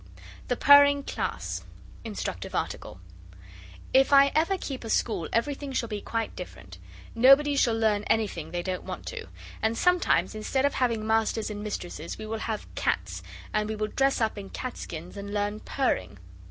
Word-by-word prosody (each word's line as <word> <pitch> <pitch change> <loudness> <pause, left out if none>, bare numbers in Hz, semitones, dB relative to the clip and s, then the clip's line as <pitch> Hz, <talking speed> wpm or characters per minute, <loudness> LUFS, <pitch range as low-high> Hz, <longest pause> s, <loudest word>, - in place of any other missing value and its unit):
THE 245 - +1
PURRING 285 +1 +7
CLASS - - -3 0.4
(Instructive 200 - -5
Article) - - -4 0.9
If 270 +2 +5
I 280 0 +7
ever 335 +5 +2
keep 270 -8 -5
a 225 - -6
school 205 -7 0
everything 280 +4 -1
shall 235 -3 -1
be 210 -2 -4
quite 225 -1 -3
different. - - -9 0.3
Nobody 275 +4 +6
shall 235 -5 +3
learn 215 -2 +2
anything 200 -8 0
they 175 +1 -3
don't 185 0 -3
want - - -7
to. 485 -2 -7 0.3
And 220 +1 +1
sometimes 355 - +3
instead 240 +5 0
of 285 - +2
having 230 -4 0
masters 220 0 +1
and 205 0 -5
mistresses 175 -6 -5
we 215 - -7
will 220 +1 -4
have 220 -1 -3
cats, - - -1 0.3
and 210 0 0
we 220 - -2
will 215 0 -2
dress 270 +3 +2
up 220 -2 0
in 195 -1 -8
cat 255 -1 -5
skins 170 +4 -8
and 200 0 -6
learn 205 +1 -1
purring. 255 - -1
225 Hz, 170 wpm, -27 LUFS, 210-270 Hz, 0.9 s, PURRING